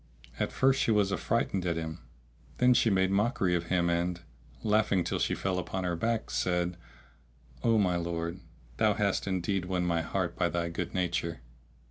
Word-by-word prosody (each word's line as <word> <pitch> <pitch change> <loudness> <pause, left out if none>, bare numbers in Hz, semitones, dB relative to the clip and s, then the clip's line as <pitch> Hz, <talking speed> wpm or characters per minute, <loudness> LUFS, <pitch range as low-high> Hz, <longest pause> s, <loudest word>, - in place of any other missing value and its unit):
At - - 0
first 135 +1 +3
she 140 - +1
was 105 -3 +3
affrighted 100 -3 0
at 85 -2 -1
him; 80 -1 -4 0.6
then 125 0 +5
she 120 -1 +3
made 95 -1 +2
mockery 100 -2 +1
of 85 -1 0
him 85 0 +1
and, 85 +1 0 0.4
laughing 105 -4 +2
till - - -2
she - - +1
fell 95 -1 -1
upon 95 +1 -3
her 90 -1 -1
back, 115 +5 -1
said, 90 -1 0 0.9
"O 115 -1 +4
my 90 -4 +2
lord, 85 +1 -3 0.4
thou - - +3
hast - - 0
indeed 95 0 -1
won 90 -1 -1
my 85 -1 +1
heart 85 +1 -2
by 85 0 +1
thy 85 0 -1
good 85 - -4
nature!" 85 -4 -1
90 Hz, 175 wpm, -30 LUFS, 85-100 Hz, 0.9 s, then